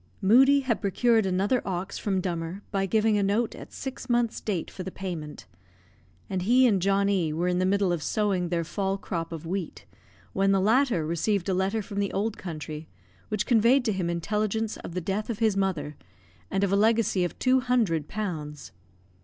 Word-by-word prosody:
Moodie 265 +8 +5
had 255 -4 -1
procured 220 +2 +2
another 195 +7 +1
ox 190 0 -4
from 190 -3 0
Dummer, 175 +1 -4
by 195 -1 0
giving 215 +1 +2
a - - +1
note 205 +4 +1
at - - -11
six 265 -1 -7
months 240 -1 +1
date 190 -6 -3
for - - -8
the 185 - -4
payment; 170 -6 -6 0.8
and 190 -2 -2
he 245 +7 +4
and 200 -6 +3
John 195 +1 +2
E 185 -6 +1
were 170 +3 -1
in 180 0 +1
the 185 - +2
middle 200 -1 +2
of 170 - -2
sowing 190 -2 0
their 170 -1 0
fall 195 +3 -2
crop 170 -4 -4
of 165 -1 -7
wheat, 180 0 -4 0.5
when 195 0 +2
the 195 - +3
latter 225 - +2
received 175 +4 0
a - - +2
letter 195 +4 0
from 200 0 -5
the 200 -1 0
old 210 +2 -1
country, 155 -3 -7 0.4
which 210 -1 -1
conveyed 240 +3 +4
to 220 - +1
him 185 -3 -2
intelligence 210 +5 -1
of 170 - -9
the 180 - -1
death 200 +6 -3
of 230 - -2
his 220 -3 +2
mother, 165 -7 -1 0.5
and 195 - 0
of 195 - +1
a - - +3
legacy 215 -2 +3
of 175 - -3
two 260 0 +3
hundred 225 - +1
pounds. 155 -8 -5
195 Hz, 195 wpm, -27 LUFS, 180-220 Hz, 0.8 s, Moodie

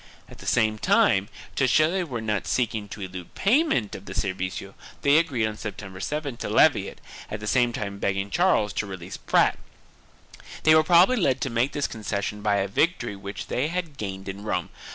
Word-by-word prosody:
At - - -14
the - - -10
same 110 -2 +2
time, 100 -1 +3 0.3
to 130 - +2
show 155 +5 +5
that - - -2
they 190 - +1
were 125 -9 -5
not 105 -3 -2
seeking 110 -4 -1
to 105 - -8
elude 90 -2 -8
pay 235 +10 +4
ment 120 - -1
of 95 - -8
the - - -8
servicio 95 0 -3 0.3
they 145 +2 +6
agreed 135 -9 0
on 110 0 -4
September 100 -3 -7
7th 145 +2 -3
to - - -4
levy - - +4
it, - - -10 0.3
at 105 - -4
the 105 - -7
same 120 +2 +2
time 100 -3 -5
begging 100 0 -1
Charles 165 - +2
to 100 - -2
release 95 -1 -7
Prat. - - +2 1.0
They 155 - +6
were 155 - +7
probably 180 +9 +5
led 135 - +2
to 135 - -1
make 120 +4 +1
this 145 - -1
concession 105 -1 -4
by 105 -1 +2
a 100 0 +1
victory 120 - 0
which 100 +1 -7
they 130 +4 -1
had 165 -4 -4
gained 95 -3 -5
in 95 +1 -6
Rome. 90 -5 -2
110 Hz, 210 wpm, -25 LUFS, 100-145 Hz, 1.0 s, were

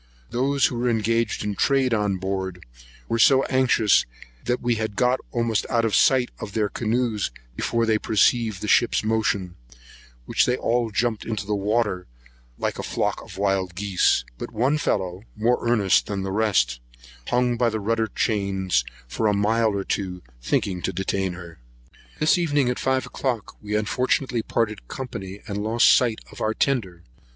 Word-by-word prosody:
Those 135 +3 +2
who 120 - -1
were 125 +1 +1
engaged 115 0 0
in 105 0 -2
trade 130 +3 +2
on 105 -3 +1
board 95 -1 -4 0.4
were 115 - -1
so 135 +3 +6
anxious, 125 -5 +3 0.4
that 125 - 0
we 120 0 +1
had 110 -2 -3
got 125 +3 +2
almost 115 -3 0
out 115 -2 +2
of 110 - -1
sight 130 -2 +4
of 100 - -7
their 105 -2 0
canoes 115 -1 -1 0.3
before 115 - 0
they 110 -1 +2
perceived 110 -1 +2
the - - -3
ship's 120 - +3
motion, 105 -4 0 0.7
when - - -9
they 125 0 +1
all 120 -1 0
jumped 110 +1 -1
into 110 -3 -4
the 105 - -2
water 105 -2 0 0.5
like - - -2
a - - -1
flock - - -2
of - - -12
wild 95 -3 0
geese; 95 -9 +2
but - - -6
one 135 +7 +1
fellow, 95 -7 -1
more 115 +3 +2
earnest 105 -5 +3
than 100 -2 -3
the 95 - -3
rest, 95 - +1 0.5
hung 125 0 +1
by 120 0 +2
the 110 -1 -3
rudder 110 +2 0
chains 95 - 0 0.2
for 110 - -1
a 105 - +2
mile 110 +3 +2
or 100 -2 -2
two, 90 -2 -3 0.2
thinking 90 +8 -1
to 95 - -1
detain 95 -1 -2
her. 85 -2 -11 0.6
This 155 +4 +3
evening, 145 -6 +1
at 125 - -2
five 130 0 0
o'clock, 120 -6 -3
we 105 0 -3
unfortunately 125 +3 0
parted 110 - -2
company, 100 - -7
and 100 -1 -3
lost 115 +2 +5
sight 120 -4 +1
of - - -11
our 110 0 0
tender. 95 -11 -1
110 Hz, 170 wpm, -24 LUFS, 100-120 Hz, 0.7 s, so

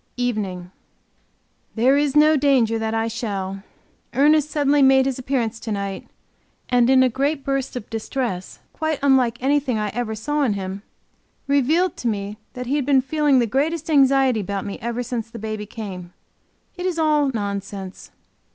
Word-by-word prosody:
EVENING. 200 -7 -3 1.0
There 250 +4 +4
is 290 -1 +1
no 305 +1 +6
danger 260 -6 +2
that 220 0 -2
I 225 0 0
shall. 195 -4 -4 0.5
Ernest 300 +2 +4
suddenly 290 -1 +2
made 265 -1 +5
his 270 -1 -2
appearance 245 -4 -2
to 225 - -6
night, 200 -1 -4 0.6
and 245 -1 +3
in 260 -1 +6
a - - +4
great 275 +4 -1
burst 275 -2 -2
of 240 -3 -6
distress 225 -4 -4 0.2
quite 315 -1 -1
unlike 255 -4 +3
anything 275 -3 +1
I 210 -1 -1
ever 220 0 -3
saw 295 +8 -2
in 250 -7 +2
him, 195 0 -5 0.6
revealed 290 +6 +2
to 245 - -3
me 205 -1 -3
that 250 0 -6
he 275 +4 0
had 280 - -1
been 275 -2 +4
feeling 290 0 +2
the 240 - +3
greatest 310 +7 -1
anxiety 270 -4 +4
about 200 0 -3
me 200 - -6
ever 235 +1 -3
since 235 -2 -4
the 230 - -9
baby 215 -1 -5
came. 185 -5 -8 0.6
It 360 +1 -2
is 355 -2 -2
all 300 -3 +2
nonsense. 200 -3 -5
245 Hz, 170 wpm, -22 LUFS, 215-280 Hz, 1.0 s, no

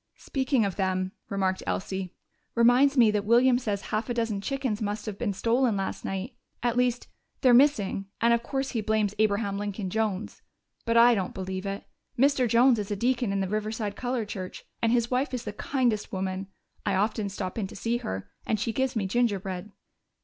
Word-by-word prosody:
"Speaking 265 -4 0
of 195 - -3
them," 185 -1 0 0.2
remarked 190 -2 0
Elsie, 190 -1 -3 0.4
"reminds 250 +4 +5
me 230 -3 +6
that 210 -1 0
William 245 +3 +5
says 205 -5 -2
half 215 +3 -1
a 240 - -1
dozen 225 -4 -1
chickens 260 -3 -2
must 210 0 -2
have 210 -3 -5
been 220 - 0
stolen 230 +2 +1
last 195 - -3
night. 195 +6 -4 0.3
At 240 -1 +1
least, 245 -1 +1 0.3
they're 255 -3 +6
missing, 230 -7 +3
and 235 0 +4
of 235 - +2
course 270 +2 -2
he 230 - -1
blames 215 -1 +1
Abraham 200 -1 +1
Lincoln 205 -2 -4
Jones. 215 -2 -2 0.4
But 230 -1 +2
I 240 +1 +8
don't 190 -5 -2
believe 190 +1 -4
it. 195 +1 -4 0.3
Mr. 270 -1 +3
Jones 235 +1 +5
is 205 - -4
a 205 - -1
deacon 240 +1 +1
in 195 0 0
the 190 - -1
Riverside 215 0 -2
Colored 245 -3 -2
Church, 185 -3 -7 0.2
and 230 - +2
his 235 0 +1
wife 255 +1 0
is 245 - -4
the 210 - -5
kindest 235 -3 0
woman. 190 -1 -3 0.4
I - - +1
often 210 +1 0
stop 190 +1 -4
in 200 - -1
to - - -11
see 230 +4 -1
her, 95 - -5 0.2
and 215 - +1
she 225 +2 -1
gives 265 0 0
me 210 -3 0
gingerbread." 195 -3 -1
215 Hz, 195 wpm, -27 LUFS, 195-245 Hz, 0.4 s, I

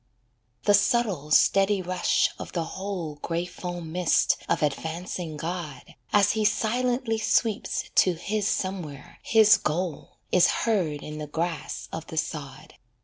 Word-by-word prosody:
The 205 - +4
subtle, 205 -7 +2
steady 195 +5 +4
rush 185 0 +1
of - - -8
the 170 - -1
whole 180 -4 -5
Grey 170 +3 -2
foam 175 -2 -6
mist 180 0 +3
of - - +1
advancing 160 +2 -3
God, 160 -5 -6 0.2
As 205 -1 +4
He 220 -1 0
silently 230 +2 +1
sweeps 220 -1 +1
to 185 - +5
His 205 +4 -2
somewhere, 180 -9 -4
his 220 -1 +6
goal, 165 0 -3
Is 180 - +5 0.2
heard 175 -10 0
in 150 0 -7
the 150 - -5
grass 165 +2 -3
of 160 0 -6
the 160 - -8
sod. 140 -4 -5
180 Hz, 140 wpm, -26 LUFS, 160-205 Hz, 0.2 s, his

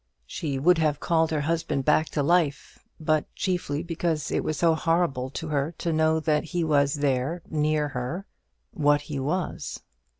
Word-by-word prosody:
She 140 - -3
would 170 +5 +4
have 150 -2 +1
called 165 0 +2
her 155 -2 0
husband 160 -3 -1
back 155 +1 +3
to 145 - -1
life; 165 -2 +1 0.2
but 155 -1 0
chiefly 175 -5 -1
because 165 -3 -2
it - - 0
was 155 - -2
so 165 +1 +4
horrible 160 -5 0
to 155 +4 -5
her 150 +2 -1
to 170 - -1
know 160 0 +3
that 155 -1 +1
he 175 +1 -2
was 145 -2 +2
there 145 +4 -1
near 150 -1 +1
her 130 +9 -4 0.5
what 145 0 +2
he 145 -1 -5
was. 155 +6 -3
155 Hz, 170 wpm, -26 LUFS, 145-165 Hz, 0.5 s, would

